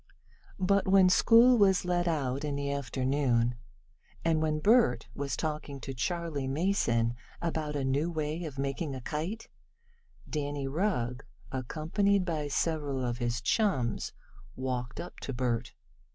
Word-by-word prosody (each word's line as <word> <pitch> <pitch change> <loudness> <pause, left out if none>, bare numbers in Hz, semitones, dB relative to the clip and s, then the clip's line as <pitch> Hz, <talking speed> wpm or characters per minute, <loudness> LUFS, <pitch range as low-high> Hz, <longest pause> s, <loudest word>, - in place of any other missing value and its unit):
But 195 +1 +2
when 190 -1 +6
school 235 +6 +6
was 190 -3 +4
let 175 0 +1
out 140 -4 -1
in 145 -2 -2
the 140 0 -2
afternoon, 130 -2 +1 0.7
and 160 -1 +2
when 155 -1 +1
Bert 200 - +3
was 140 -1 -3
talking 150 -3 -3
to 135 - -5
Charley 160 0 -2
Mason 135 -7 +1 0.3
about 160 -3 -2
a 140 -2 -1
new 140 +5 +1
way 155 0 -2
of 145 -3 -7
making 140 +2 -2
a 130 - -6
kite, 165 - -4 0.8
Danny 145 -2 -3
Rugg, 135 - -1 0.3
accompanied 165 - 0
by 155 -4 -2
several 145 -3 -1
of 120 0 -2
his 120 -1 -1
chums, 155 - +1 0.4
walked 125 -1 -3
up 175 - -7
to 135 - -5
Bert. 120 -1 -2
145 Hz, 140 wpm, -30 LUFS, 130-175 Hz, 0.8 s, when